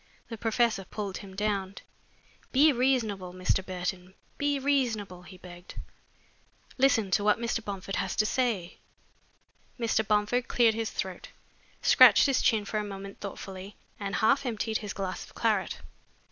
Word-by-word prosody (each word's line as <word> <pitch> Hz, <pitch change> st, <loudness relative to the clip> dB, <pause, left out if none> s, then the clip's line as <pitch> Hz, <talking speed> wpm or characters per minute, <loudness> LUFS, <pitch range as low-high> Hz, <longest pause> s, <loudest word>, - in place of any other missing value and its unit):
The 230 Hz, -, -6 dB
professor 225 Hz, -2 st, +1 dB
pulled 200 Hz, +1 st, -5 dB
him 195 Hz, -2 st, -11 dB
down. 200 Hz, -2 st, -1 dB, 0.8 s
"Be 295 Hz, +4 st, +6 dB
reasonable, 225 Hz, -8 st, 0 dB
Mr. 185 Hz, +1 st, 0 dB
Burton 185 Hz, 0 st, -5 dB, 0.2 s
be 285 Hz, 0 st, +1 dB
reasonable," 240 Hz, -10 st, -1 dB
he 185 Hz, +1 st, -13 dB
begged. 175 Hz, 0 st, -12 dB, 1.0 s
"Listen 250 Hz, -7 st, +2 dB
to 205 Hz, -, +2 dB
what 210 Hz, 0 st, +4 dB
Mr. 230 Hz, -1 st, -2 dB
Bomford 195 Hz, -1 st, -5 dB
has -, -, -2 dB
to 215 Hz, -, +2 dB
say." 215 Hz, -7 st, -1 dB, 1.0 s
Mr. 230 Hz, -2 st, +1 dB
Bomford 210 Hz, +4 st, +1 dB
cleared 235 Hz, -2 st, +3 dB
his 225 Hz, -1 st, -2 dB
throat, 190 Hz, -2 st, -5 dB, 0.6 s
scratched -, -, +7 dB
his 275 Hz, -3 st, +2 dB
chin 215 Hz, -3 st, +2 dB
for 215 Hz, +1 st, -2 dB
a -, -, -2 dB
moment 195 Hz, -1 st, -8 dB
thoughtfully, 195 Hz, 0 st, -8 dB, 0.2 s
and 200 Hz, -1 st, -3 dB
half 270 Hz, +6 st, +3 dB
emptied 225 Hz, -3 st, -2 dB
his 205 Hz, -1 st, -6 dB
glass 190 Hz, -2 st, -4 dB
of -, -, -16 dB
claret. -, -, 0 dB
210 Hz, 145 wpm, -28 LUFS, 190-235 Hz, 1.0 s, scratched